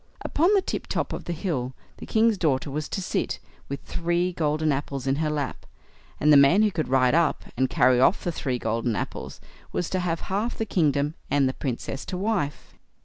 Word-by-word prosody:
Upon 340 +6 +2
the 390 - +3
tip - - -4
top - - -2
of - - -6
the - - -3
hill 145 -8 -2 0.2
the - - -9
king's 225 0 +3
daughter 140 -3 +1
was 150 +2 -3
to 195 - -3
sit, - - -1 0.3
with 140 - -4
three 175 +1 -1
golden 155 -1 +1
apples 140 -1 -3
in 135 +1 +1
her 155 0 0
lap, 145 -3 -3 0.6
and 150 +1 +5
the - - +9
man 140 +10 +6
who 210 - +3
could 160 -3 -2
ride 130 0 +3
up 170 +1 +2
and 130 +1 +1
carry 125 -1 +4
off 150 +9 +4
the 175 - -1
three 130 -6 -2
golden 115 0 -1
apples, - - -5 0.3
was 175 - -2
to 185 - +1
have 170 -2 -1
half 205 +5 -2
the 225 - -1
kingdom, 150 -6 +1 0.2
and 140 -1 +3
the 130 - -1
Princess 135 +1 -4
to 185 - -4
wife. 190 -8 -2
150 Hz, 205 wpm, -25 LUFS, 135-180 Hz, 0.6 s, the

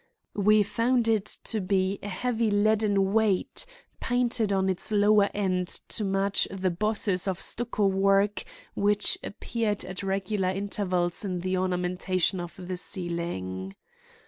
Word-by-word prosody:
We 210 +1 +5
found 235 +3 +1
it 215 -3 +1 0.2
to 220 -2 -2
be 190 +1 0
a 205 - -6
heavy 230 +2 0
leaden 205 -1 +2
weight 220 - +1 0.3
painted 240 -3 +1
on 190 -1 +1
its 190 +3 -1
lower 205 -1 +4
end 185 -3 -1 0.2
to 215 - -1
match 195 0 +2
the 190 -1 -1
bosses 200 0 0
of 190 -1 -1
stucco 235 -3 -1
work 195 +1 +2 0.3
which 205 +1 +2
appeared 210 0 -3
at 185 +1 -5
regular 195 0 -1
intervals 185 -2 -1
in 180 -3 -3
the 185 +1 -1
ornamentation 185 0 0
of 175 -1 -7
the 185 0 -5
ceiling. 170 - -4
195 Hz, 135 wpm, -27 LUFS, 185-210 Hz, 0.3 s, We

